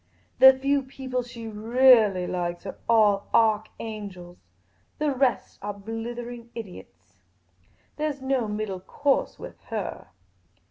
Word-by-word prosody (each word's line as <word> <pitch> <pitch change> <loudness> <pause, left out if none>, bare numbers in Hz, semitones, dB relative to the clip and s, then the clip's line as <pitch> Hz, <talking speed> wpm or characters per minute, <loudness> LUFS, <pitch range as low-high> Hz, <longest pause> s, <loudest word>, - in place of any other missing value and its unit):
The 265 - +11
few 275 +2 +1
people 260 -1 -4
she 240 -1 -9
reahlly 220 -3 +4
likes 175 0 -3
are 190 - -6
all 210 -3 +4
arch 220 -1 +3
angels; 195 -5 -8 0.6
the 300 -1 0
rest 255 -3 0
are 205 0 -4
blithering 235 +3 -6
idiots; 180 - -10 0.8
there 305 0 0
's 285 - -10
no 265 -3 0
middle 210 -2 -3
course 275 +8 0
with - - -10
her." 215 - -5
225 Hz, 125 wpm, -26 LUFS, 200-255 Hz, 0.8 s, The